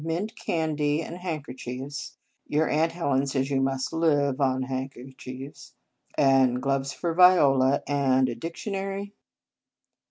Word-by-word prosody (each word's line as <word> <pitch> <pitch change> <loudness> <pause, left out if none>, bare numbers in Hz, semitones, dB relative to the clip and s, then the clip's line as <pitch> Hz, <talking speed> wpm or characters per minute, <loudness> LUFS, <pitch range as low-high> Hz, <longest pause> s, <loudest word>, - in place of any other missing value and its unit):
Mint 175 +8 -3
candy, 155 -4 -1
and 165 - -7
handkerchiefs, 140 -5 -6 0.3
your 155 +2 +1
Aunt 160 +2 +1
Helen 140 -5 0
says 135 0 -1
you 135 -1 +2
must 135 +1 -1
live 145 -4 +1
on 130 -1 +1
handkerchiefs, 130 0 -7 0.4
and 135 -3 +4
gloves 135 +1 -1
for 170 +3 -3
Viola, 140 -7 +5
and 130 -2 +2
a 120 - -2
diction 165 - -6
ary?" 195 +1 -4
140 Hz, 125 wpm, -26 LUFS, 130-165 Hz, 0.4 s, Viola